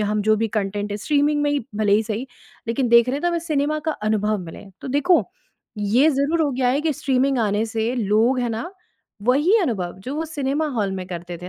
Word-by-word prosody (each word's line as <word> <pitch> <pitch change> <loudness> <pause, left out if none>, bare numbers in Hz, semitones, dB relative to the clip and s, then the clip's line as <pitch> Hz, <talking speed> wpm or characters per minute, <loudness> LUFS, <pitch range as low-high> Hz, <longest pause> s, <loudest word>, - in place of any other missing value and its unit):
हम 210 0 0
जो 215 +1 +3
भी 225 +1 0
कंटेंट 205 +1 -3
है, 205 - -2
स्ट्रीमिंग 295 +5 +1
में 290 - +1
ही 285 -5 -1
भले 210 -2 +2
ही 215 - +4
सही, 225 +4 -4 0.4
लेकिन 245 +2 0
देख 235 +1 +6
रहे 260 - 0
हैं 290 - -6
तो 350 - +2
हमें 340 - 0
सिनेमा 300 +1 +1
का 315 - +2 0.2
अनुभव 215 0 +1
मिले। 165 - -10 0.2
तो - - -7
देखो, 290 +7 +3 0.6
ये 225 +9 +3
ज़रूर 285 +4 0
हो 290 - +1
गया 255 -1 0
है 270 +3 +1
कि 310 0 0
स्ट्रीमिंग 270 0 +1
आने 210 -1 +1
से 225 +2 -2
लोग 225 +3 +2
है 240 - -1
ना, 230 +11 -4 0.5
वही 290 - +3
अनुभव, 190 - -2
जो 265 - -4
वो 315 +2 -2
सिनेमा 295 0 -1
हॉल 215 -7 -1
में 185 -1 -5
करते 175 0 -6
थे 180 - -6
245 Hz, 230 wpm, -22 LUFS, 210-285 Hz, 0.6 s, देख